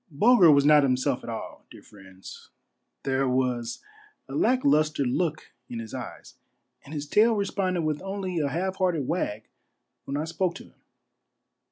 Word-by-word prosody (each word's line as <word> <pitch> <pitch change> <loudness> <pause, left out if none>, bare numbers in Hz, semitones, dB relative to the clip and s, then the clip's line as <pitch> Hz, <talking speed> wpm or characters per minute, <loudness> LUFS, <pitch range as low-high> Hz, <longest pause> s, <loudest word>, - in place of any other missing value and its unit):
Bulger 185 - +5
was 140 -1 +4
not 150 0 +7
himself 130 0 0
at - - -7
all, 115 - -7
dear - - -14
friends. 95 -2 -14 0.5
There 135 0 0
was 125 -2 -1 0.4
a - - -9
lack 255 +2 +1
lustre 155 - +2
look 155 +5 -2 0.2
in 120 - -6
his 115 -1 -7
eyes, - - -8 0.5
and 140 - -14
his 150 -2 -4
tail 220 +9 +3
responded 190 -3 -1
with 155 -1 -2
only 190 -2 -3
a 145 -2 0
half 185 +6 -2
hearted 170 -8 0
wag 110 -11 -2 0.6
when 140 - -3
I 150 - -1
spoke 170 +2 -2
to - - -9
him. - - -22
150 Hz, 165 wpm, -26 LUFS, 130-185 Hz, 0.6 s, not